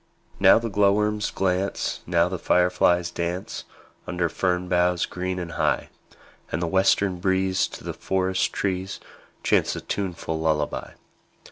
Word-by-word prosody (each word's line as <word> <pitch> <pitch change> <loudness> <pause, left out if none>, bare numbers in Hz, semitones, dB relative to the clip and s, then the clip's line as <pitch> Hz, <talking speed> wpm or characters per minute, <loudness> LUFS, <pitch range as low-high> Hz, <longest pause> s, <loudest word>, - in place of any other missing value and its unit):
Now - - +7
the 115 +1 -2
glowworms 105 +1 +2
glance, 95 +1 -1
Now 85 0 +3
the 90 -1 -4
fireflies 90 -1 +2
dance, 85 +2 -4 0.4
Under 90 -1 0
fern 90 +1 0
boughs 90 0 +2
green 90 0 -4
and 85 -2 -5
high; - - 0 0.6
And 75 - -1
the 85 - -1
western 95 +1 +2
breeze 95 0 +1
To - - -10
the - - -4
forest 95 0 0
trees 95 0 -2 0.4
Chants - - +2
a - - -5
tuneful 85 -5 -3
lullaby. 80 -2 -1
90 Hz, 135 wpm, -24 LUFS, 85-95 Hz, 0.6 s, Now